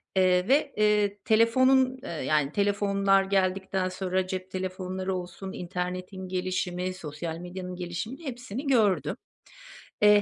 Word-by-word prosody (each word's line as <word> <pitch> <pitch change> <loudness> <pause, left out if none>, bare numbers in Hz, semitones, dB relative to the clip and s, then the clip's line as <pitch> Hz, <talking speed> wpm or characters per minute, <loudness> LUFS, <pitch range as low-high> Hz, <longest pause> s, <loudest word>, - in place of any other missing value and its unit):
Eee, 185 -1 +3
ve, 280 +1 +3
eee, 210 -1 +3
telefonun 255 +4 +4
eee, - - -6
yani, 150 -2 0
telefonlar 200 0 +2
geldikten 190 -1 0
sonra, 185 0 -1
cep 185 0 -5
telefonları 185 0 -3
olsun, 180 +1 -6
internetin 185 +1 -4
gelişimi, 185 0 -2
sosyal 160 -1 -6
medyanın 180 +1 -6
gelişimini, 180 - -5
hepsini 245 +1 -5
gördüm. 220 -8 +3 0.9
Eee, 210 0 +7
190 Hz, 120 wpm, -27 LUFS, 180-210 Hz, 0.9 s, Eee